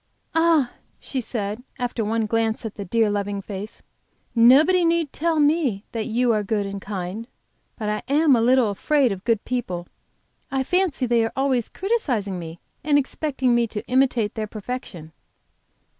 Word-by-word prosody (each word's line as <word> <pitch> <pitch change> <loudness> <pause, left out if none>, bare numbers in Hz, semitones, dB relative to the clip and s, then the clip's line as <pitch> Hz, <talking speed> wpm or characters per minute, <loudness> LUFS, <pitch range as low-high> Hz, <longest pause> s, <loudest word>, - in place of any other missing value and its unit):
"Ah!" 325 -6 +3 0.3
she 265 - -3
said, 215 -1 -3 0.2
after 245 -3 -2
one 220 +1 0
glance 225 +1 -1
at 220 - -4
the 200 - -6
dear, 225 +4 +2
loving 205 0 -2
face, 200 +1 -7 0.5
"nobody 285 +10 +6
need 335 -3 +1
tell 325 0 0
me 290 -9 +2
that 225 -2 -3
you 240 +1 +2
are 215 - +1
good 205 0 -1
and 195 0 -5
kind. 195 +3 -5 0.5
But 215 - -4
I 210 0 -1
am 295 -1 +5
a 230 - +2
little 245 -2 +4
afraid 270 +4 +2
of 190 -1 -5
good 230 -3 0
people. 185 -9 -3 0.6
I 270 -1 0
fancy 355 -3 +1
they 235 -1 +2
are 225 - -2
always 265 -4 0
criticising 250 - -1
me 165 0 -8 0.2
and 290 0 +3
expecting 270 -2 0
me 235 -1 +2
to 210 -1 -6
imitate 250 -4 +2
their 215 -1 -3
perfection." 210 -7 -7
235 Hz, 165 wpm, -23 LUFS, 210-270 Hz, 0.6 s, nobody